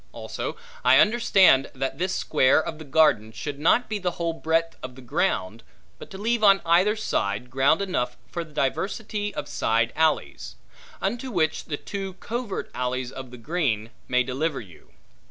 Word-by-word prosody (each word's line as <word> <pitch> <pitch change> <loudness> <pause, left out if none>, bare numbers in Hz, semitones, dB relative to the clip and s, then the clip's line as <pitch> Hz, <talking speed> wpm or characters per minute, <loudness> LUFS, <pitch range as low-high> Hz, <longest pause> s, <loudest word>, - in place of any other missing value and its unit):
Also - - -5 0.3
I - - +6
understand, 200 - +5
that 135 +3 -3
this 185 +1 -1
square 135 -2 +3
of 160 -1 -5
the - - -8
garden, 140 -7 +3
should 140 +6 -6
not 205 +11 +3
be 215 -1 -3
the 180 -2 -2
whole 170 -1 -1
breadth 165 +1 0
of 130 -1 -8
the 130 - -12
ground, 120 - -1 0.4
but - - -10
to 190 - -9
leave 225 +2 0
on 195 -1 +7
either 180 +6 +4
side, 120 - -2
ground 135 +8 +3
enough 125 -10 -2
for 170 - -5
diversity 205 - -2
of - - -4
side 115 +1 0
alleys; 155 - 0 0.5
unto 240 +7 -2
which 160 -7 0
the 145 - -4
two 195 +2 -6
covert 225 +2 -5
alleys 125 0 -2
of 130 -1 -8
the 125 - -11
green, 115 -6 -1 0.2
may 125 0 +2
deliver 135 +4 -2
you. 90 -7 -14
160 Hz, 170 wpm, -25 LUFS, 125-195 Hz, 0.5 s, on